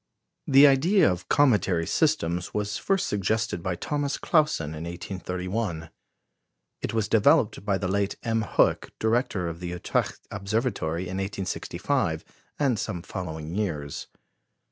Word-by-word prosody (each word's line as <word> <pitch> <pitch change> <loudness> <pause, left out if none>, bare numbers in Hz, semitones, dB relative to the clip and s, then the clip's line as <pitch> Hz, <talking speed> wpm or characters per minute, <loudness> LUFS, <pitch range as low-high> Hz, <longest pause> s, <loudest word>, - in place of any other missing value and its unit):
The 140 +1 +8
idea 155 - +5
of 90 0 -5
cometary 100 - +3
systems 85 +2 0
was 105 -1 -1
first 195 -1 +1
suggested 105 -1 -1
by 90 +1 -2
Thomas 145 - -2
Clausen 150 - +2
in 80 +1 -6
1831. 90 0 -4 0.9
It - - -2
was 110 -2 +1
developed 105 -1 +3
by 100 -2 +1
the 95 - -2
late 100 +1 0
M. 115 -1 +1
Hoek, 110 - +2
director 110 -5 0
of 85 0 -5
the 90 - -5
Utrecht 90 -1 -2
Observatory, 100 -5 -1
in 95 0 -4
1865 95 -1 -2 0.3
and 130 -7 +1
some 85 -4 -3
following 80 -4 -5
years. 80 -9 -3
100 Hz, 130 wpm, -26 LUFS, 85-115 Hz, 0.9 s, The